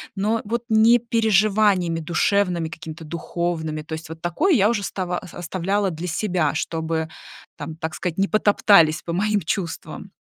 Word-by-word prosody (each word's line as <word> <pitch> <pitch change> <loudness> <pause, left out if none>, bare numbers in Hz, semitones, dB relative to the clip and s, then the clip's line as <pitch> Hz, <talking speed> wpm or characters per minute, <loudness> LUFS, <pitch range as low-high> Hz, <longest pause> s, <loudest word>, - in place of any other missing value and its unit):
но, 210 +3 0
э, - - -6
вот 235 +3 -2
не 225 +2 +5
переживаниями 210 -6 +2
душевными, 175 +1 +1
какими-то 160 +1 -9
духовными. 160 -1 -3
То 155 - -16
есть 160 +1 -6
вот 160 0 -10
такое 175 - +1
я 210 -6 +4
уже 220 -3 -1
става 180 -2 -3
ос 185 - -12
оставляла 190 +3 -1
для 165 +3 -5
себя, 175 -3 0
чтобы, 160 -1 -2 0.5
там, 160 - -6
так 160 0 -5
сказать, 175 -1 -4
не 195 +1 +1
потоптались 200 -6 +4
по 170 - -6
моим 205 +3 +1
чувствам. 170 +2 -4
180 Hz, 165 wpm, -22 LUFS, 160-205 Hz, 0.5 s, не